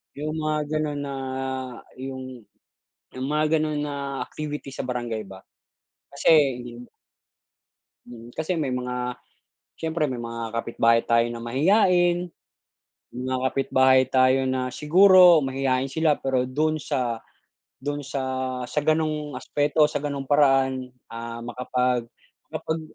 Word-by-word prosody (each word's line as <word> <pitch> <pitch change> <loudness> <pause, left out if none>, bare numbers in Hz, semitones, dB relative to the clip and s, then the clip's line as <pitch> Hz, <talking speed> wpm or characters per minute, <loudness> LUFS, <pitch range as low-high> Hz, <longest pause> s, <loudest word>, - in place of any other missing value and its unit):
Yung 150 +2 -3
mga 155 0 -1
gano'n 150 -2 -2
na 140 -1 -5 0.8
yung 130 -3 -7 0.7
yung 130 +1 -3
mga 155 +1 +2
gano'n 155 -1 -1
na 145 -1 -3 0.3
activity 150 -2 -5
sa 130 - -5
barangay 120 -3 -3
ba? 95 -1 -12 0.7
Kasi 140 - +2 0.3
hindi 120 0 -8
mo - - -17 1.2
Mm, 120 -1 -11
kasi 160 +3 -1
may 155 -6 -1
mga 125 -1 -3 0.6
siyempre 160 -1 -1
may 130 -4 -2
mga 115 -1 -5
kapit-bahay 115 0 +2
tayo 115 0 +4
na 120 - -6
mahiyain, 175 - +3 0.8
mga 130 +1 -3
kapitbahay 130 -1 +3
tayo 130 0 +3
na 130 -1 -1
siguro 180 +1 +6
mahiyain 135 0 -1
sila 155 0 +2
pero 130 -1 -1
do'n 155 +4 0
sa, 125 -6 -2 0.6
do'n 145 0 -3
sa, 135 -1 -3 0.5
sa 150 - 0
ganong 155 -2 0
aspeto 145 +4 0
sa - - -1
ganung 140 -1 -5
paraan, 135 -3 +3 0.2
ah, 115 0 -6
makapag 125 0 -1 0.5
makapag 160 0 -2
135 Hz, 125 wpm, -24 LUFS, 125-150 Hz, 1.2 s, siguro